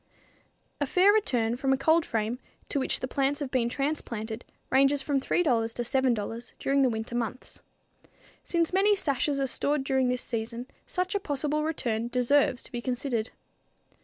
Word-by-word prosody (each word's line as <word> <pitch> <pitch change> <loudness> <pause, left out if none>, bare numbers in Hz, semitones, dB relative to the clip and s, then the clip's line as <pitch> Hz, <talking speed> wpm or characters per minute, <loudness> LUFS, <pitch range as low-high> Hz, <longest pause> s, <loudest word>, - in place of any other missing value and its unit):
A 285 - 0
fair 375 +7 +5
return 240 - +1
from 270 +1 0
a - - +2
cold 320 +4 +3
frame 225 +2 -1 0.3
to 285 - 0
which 265 - 0
the 255 - -2
plants 275 +2 0
have 280 -3 -4
been 240 -3 +1
transplanted 240 -5 -3 0.3
ranges 275 +1 +4
from 280 -2 0
$3 355 - +1 0.3
to 240 - -1
$7 240 -3 -1
during 275 0 +1
the 260 - +4
winter 225 +1 -4
months. 240 +1 -4 0.8
Since 335 0 0
many 405 +2 +4
sashes 285 -5 0
are 275 - +1
stored 285 +2 0
during 265 -2 +1
this 250 0 -1
season, 230 +1 -4 0.2
such 365 0 -1
a 405 - +1
possible 300 -3 -1
return 235 -8 -1
deserves 250 +1 +2
to - - -10
be 240 - -4
considered. 245 -2 -2
265 Hz, 165 wpm, -28 LUFS, 240-290 Hz, 0.8 s, fair